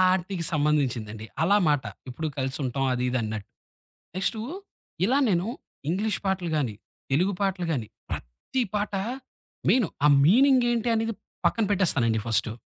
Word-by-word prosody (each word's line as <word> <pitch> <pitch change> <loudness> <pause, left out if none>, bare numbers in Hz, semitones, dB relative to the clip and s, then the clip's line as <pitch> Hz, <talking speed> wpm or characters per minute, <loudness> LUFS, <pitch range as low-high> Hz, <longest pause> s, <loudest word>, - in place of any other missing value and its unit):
ఆటికి 180 -1 -3
సంబంధించింది 130 -8 0 0.2
అలా 200 +4 +5
మాట, 145 -2 +2 0.3
ఇప్పుడు 155 +6 -3
కలిసి 130 0 -1
ఉంటాం 135 +1 -1
అది 125 - -1
ఇది 125 - 0
అన్నట్టు. 110 -2 -4 0.7
నెక్స్టు 205 +4 0 0.6
ఇలా 260 +8 +3
నేను 180 -2 +2 0.4
ఇంగ్లీష్ 205 +6 0
పాటలు 190 -2 0
గాని 125 -8 0 0.4
తెలుగు 180 +9 +2
పాటలు 190 -3 0
గాని 120 -8 -2 0.2
ప్రతి - - -3
పాట 205 -1 -1 0.7
మెయిన్ 245 -7 +4 0.2
ఆ - - +7 0.2
మీనింగేంటి 240 - +4
అనేది 225 0 0 0.3
పక్కన 225 - +2
పెట్టేస్తానండి 135 - +2
ఫర్స్టు, 110 -1 +1
170 Hz, 135 wpm, -26 LUFS, 125-205 Hz, 0.7 s, ఆ